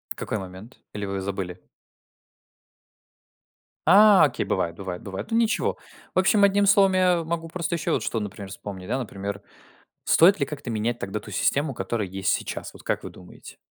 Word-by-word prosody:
Какой 110 - -3
момент? 95 +5 -10 0.2
Или 105 -1 -4
вы 100 0 -3
забыли? 95 -2 -5 2.3
А, 205 +2 +8
окей, - - -2
бывает 85 -1 -1
бывает 90 -1 -6
бывает, 95 - -7
ну, 225 - +2
ничего. 230 -1 +1 0.4
В - - +2
общем, 200 +2 +4
одним 200 0 +4
словом, 195 -1 +5
я 180 -2 +3
могу 165 0 -3
просто 170 0 -3
ещё 165 - -1
вот 125 - 0
что, 115 - -1
например, 100 -2 -7
вспомнить. 95 -1 -8
Да, 130 - -1
например, 100 -3 -5 0.6
стоит 180 +3 +5
ли 140 - +1
как-то 145 -2 -7
менять 115 +2 -1
тогда 95 +2 -4
ту 105 - -12
систему, 140 +8 +1
которая 105 +1 -3
есть 95 +1 -1
сейчас? - - -4
Вот - - -14
как - - -2
вы - - -6
думаете? 90 - -14
115 Hz, 175 wpm, -25 LUFS, -, 2.3 s, А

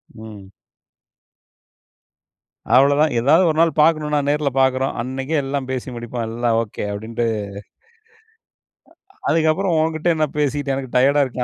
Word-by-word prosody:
ம். 105 -4 -11 2.3
அவ்ளோதான். 145 +3 +4
எதாவது 150 +9 +4
ஒரு 155 - -1
நாள் 165 - +3
பார்க்கணும்னா 150 -1 +2
நேர்ல 150 -1 +1
பார்க்குறோம். 130 0 +1
அன்னைக்கே 135 +5 -3
எல்லாம் 135 -1 -3
பேசி 130 0 -4
முடிப்போம். 120 0 -5
எல்லாம் 115 0 0
ஓகே 105 -1 -7
அப்டின்ட்டு. 115 +3 -4 1.9
அ - - -32
அதுக்கு 160 -1 +2
அப்புறம் 190 0 -1
உன்கிட்ட 160 +1 -2
என்ன 155 -1 +1
பேசிக்கிட்டு, 145 -1 -1
எனக்கு 130 -2 -6
டயர்ட்டா 140 +3 +4
இருக்கு. 125 -1 -4
135 Hz, 125 wpm, -20 LUFS, 120-155 Hz, 2.3 s, அவ்ளோதான்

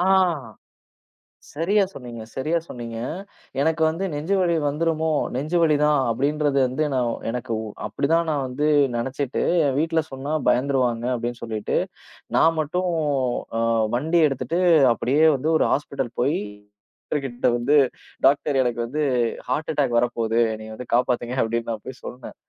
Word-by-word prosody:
அ. - - +2 1.5
சரியா 195 +7 +2
சொன்னீங்க, 120 -7 -9
சரியா 155 +6 0
சொன்னீங்க. 115 -2 -7 0.6
எனக்கு 160 +1 +1
வந்து 165 +5 -1
நெஞ்சு 155 +7 -1
வலி 175 -2 +2
வந்துருமோ? 160 +2 0 0.2
நெஞ்சு 150 +7 -1
வலி 155 -2 +4
தான். 150 -1 +4
அப்படிங்கறது 140 +4 +1
வந்து 130 +4 -1
நான் 120 -2 +1 0.2
எனக்கு 120 0 -3 0.3
அப்படி 140 - -2
தான். 170 0 +3
நான் 145 -3 0
வந்து 130 +4 -2 0.3
நினைச்சுட்டு 130 +2 -2 0.3
வீட்டுல 160 +2 +1
சொன்னா 135 +3 -5 0.2
பயந்துருவாங்க 125 -3 +1
அப்படின்னு 120 0 -4
சொல்லிட்டு, 110 -2 -2 0.6
நான் 165 0 +4
மட்டும் 180 +4 -1 0.7
அ, 115 - +1 0.3
வண்டி 160 +7 +1
எடுத்துட்டு 150 +5 -2 0.3
அப்படியே 140 +7 +1
வந்து 145 +4 -1
ஒரு - - +2
ஹாஸ்பிட்டல் 135 -4 -2
போய் 140 +5 +2 0.7
டாக்டர் 145 -2 -1
கிட்ட 120 -1 -1
வந்து 125 +5 +2 0.5
டாக்டர் 140 +1 +3
எனக்கு 120 -1 -2
வந்து 145 +6 -3 0.5
ஹார்ட் 150 +5 -1
அட்டாக் 135 -5 +1
வரப்போகுது. 115 -1 0
என்னைய 110 0 -8
வந்து 125 +1 -9
காப்பாத்துங்க, 125 0 0
அப்படின்னு, 115 +1 -2
நான் 110 -2 -5
போய்ச் 130 -1 -9
சொன்னேன். 125 0 -8
135 Hz, 140 wpm, -23 LUFS, 120-155 Hz, 1.5 s, வலி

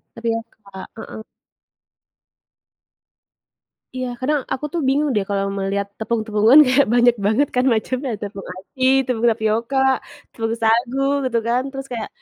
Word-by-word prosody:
Tapioka, 225 -4 -5
heeh. 220 0 -8 2.7
Iya, 255 0 -2
kadang 295 +3 +1
aku 300 +3 -3
tuh 340 - -1
bingung 290 +2 +2
deh 205 -2 +1
kalau 195 0 0
melihat 200 +1 -1
tepung-tepungan 220 +3 +3
kayak 260 +2 +4
banyak 240 0 +5
banget 245 +7 +2
kan 250 - +3
macamnya 255 +4 -2
tepung 200 -1 -7
aci, 200 +8 -6 0.2
tepung 240 -2 0
tapioka, 225 +4 -1 0.5
tepung 225 0 -3
sagu, 235 +4 +2 0.3
gitu 235 -2 0
kan 245 +2 +2
terus 270 0 -7
kayak 225 -2 -4
230 Hz, 130 wpm, -20 LUFS, 215-255 Hz, 2.7 s, banyak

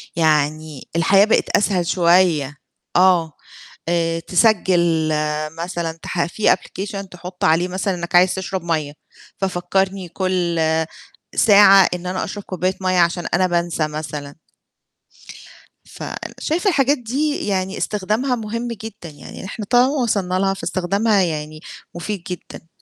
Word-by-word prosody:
يعني 155 -2 0
الحياة 195 +4 +5
بقت 220 - +1
أسهل 190 -4 0
شوية، 170 -6 +3 0.4
آه، 175 -3 +4 0.6
آآ، 165 -1 0
تسجل 175 -4 +2 0.5
مثلًا 170 -2 -4
تح 170 - -1
في 210 +5 +1
Application 200 0 -7
تحُط 180 +2 -9
عليه 165 +2 +3
مثلًا 185 +1 -2
إنك 170 0 -4
عايز 180 +1 +5
تشرب 190 -1 -4
مَيّة 155 -4 -2 0.4
ففكّرني 190 0 -1
كُل 180 -3 -1 0.8
ساعة 200 -3 +7
إن 180 0 -6
أنا 185 +1 -2
أشرب 205 +1 -6
كوباية 185 +1 -2
مَيّة، 185 -1 +1
عشان 170 0 +1
أنا 185 +1 +3
بانسى 170 -3 -1
مثلًا. 150 -2 -6 1.5
ف - - -11 0.4
شايفة 335 +6 -1
الحاجات 285 -4 +2
دي 275 +3 -2
يعني 190 -1 -1
استخدامها 215 +6 -1
مهم 230 +1 -4
جدًا، 220 -7 -8
يعني 150 +5 -11
إحنا 205 +2 -6
طالما 245 +1 +5 0.2
وصلنا 195 -5 0
لها 195 0 +1
فاستخدامها 200 +3 0
يعني 155 -3 -3 0.4
مفيد 175 +2 -5
جدًا، 175 -2 -8
185 Hz, 125 wpm, -20 LUFS, 170-200 Hz, 1.5 s, ساعة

